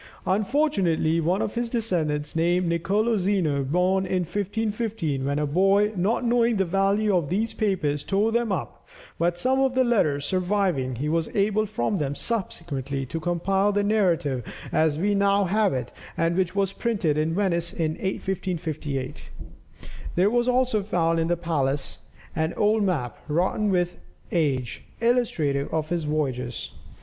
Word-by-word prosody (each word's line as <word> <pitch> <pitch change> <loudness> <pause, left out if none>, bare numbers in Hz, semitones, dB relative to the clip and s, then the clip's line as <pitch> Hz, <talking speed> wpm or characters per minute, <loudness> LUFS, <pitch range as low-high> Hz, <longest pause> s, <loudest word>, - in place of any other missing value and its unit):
Unfortunately 190 - +1
one 180 +5 +1
of - - -3
his 235 0 -2
descendants 170 -10 -1
named 175 +2 +2
Nicolo 200 +7 +1
Zeno, 180 -8 +1
born 180 +6 +1
in 185 0 0
1515, 205 - -2
when 140 +1 0
a 150 - +1
boy, 195 +7 +3
not 205 +7 0
knowing 235 -1 +3
the 195 -1 +1
value 195 +3 +2
of 165 -6 0
these 215 +5 -1
papers, 155 -9 0
tore 205 +3 +1
them 235 -1 0
up, 185 - -4 0.3
"but 175 +1 +1
some 260 +8 +1
of 265 -1 +2
the 260 - +4
letters 155 - +1
surviving, 180 -8 0
he 140 +6 -3
was 165 +1 0
able 210 +1 +2
from 210 -1 -1
them 145 -1 -2
subsequently 145 - -3
to 165 +6 -4
compile 190 +4 +1
the 205 0 +1
narrative 175 - +1 0.3
as 155 -2 +2
we 205 +5 +1
now 200 0 +3
have 205 +2 +2
it, 125 -2 -3 0.3
and 165 +1 +1
which 185 0 0
was 195 -1 +1
printed 195 -11 0
in 155 +2 0
Venice 170 -4 0
in 160 -2 -1
1558. 155 - -4 0.9
There 190 +4 +3
was 240 0 +2
also 250 -3 +2
found 165 -4 +1
in 165 - +1
the 175 0 +1
palace 145 -5 -1 0.4
an 160 +1 -1
old 215 +1 +2
map, 160 - -1
rotten 180 +7 +1
with 175 -2 0 0.3
age, 135 -8 -1 0.2
illustrative 170 - +1
of 155 -1 -1
his 170 -3 -1
voyages. 130 -5 -2
180 Hz, 155 wpm, -25 LUFS, 155-205 Hz, 0.9 s, the